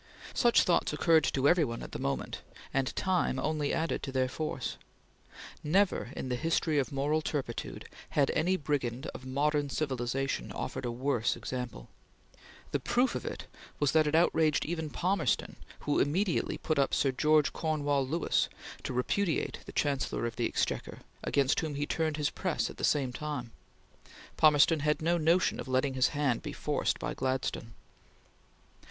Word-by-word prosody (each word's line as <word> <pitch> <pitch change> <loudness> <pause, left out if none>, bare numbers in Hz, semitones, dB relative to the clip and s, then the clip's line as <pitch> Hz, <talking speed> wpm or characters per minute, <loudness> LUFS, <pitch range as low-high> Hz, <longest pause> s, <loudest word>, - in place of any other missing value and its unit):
Such 240 -1 +4
thoughts 170 -3 +2
occurred 160 0 +4
to 135 0 +2
every 175 +1 +5
one 115 -4 -3
at - - -8
the - - -5
moment 70 - -3 0.3
and 135 -1 +1
time 185 -8 +1
only 150 +1 0
added 160 0 -1
to 135 - -5
their 130 -1 +1
force. 155 +4 -4 0.9
Never 185 - +2
in - - -4
the 125 - -1
history 160 +1 +1
of 130 -4 0
political 145 +3 0
turpitude 135 -6 -4 0.2
had 140 -2 +2
any 185 +3 +1
brigand 135 -3 -2
of 130 - -9
modern 145 +2 +1
civilization 135 - -2
offered - - -4
a 120 - -1
worse 125 -1 0
example. 125 - -5 0.8
The 145 - +1
proof 245 - +1
of - - -4
it - - -5 0.3
was 145 -2 +3
that 155 -1 +4
it 150 - +1
outraged 160 -2 +3
even 160 -1 -3
Palmerston, 180 +2 0 0.3
who 145 - +1
immediately 175 +6 +1
put 155 -3 -1
up 140 - +2
Sir 135 - +2
George 150 +3 +3
Cornewall 145 -3 0
Lewis 160 +6 +1 0.3
to - - -4
repudiate 160 +8 0
the - - -7
Chancellor 140 -4 0
of 115 - -3
the 120 - 0
Exchequer, - - -2 0.2
against 140 -1 +2
whom 155 -3 -3
he 145 +1 -1
turned 155 0 -1
his 150 -1 0
press 185 -4 -1
at - - -14
the - - -7
same 135 -4 +2
time. 145 -5 -4 0.8
Palmerston 155 +1 +5
had 150 +1 +1
no 170 +1 +2
notion 170 +4 +3
of - - -5
letting 130 +1 +1
his 130 0 +3
hand 145 -5 0
be - - -6
forced - - -1
by - - -3
Gladstone. 130 -3 -2
145 Hz, 165 wpm, -31 LUFS, 130-160 Hz, 0.9 s, every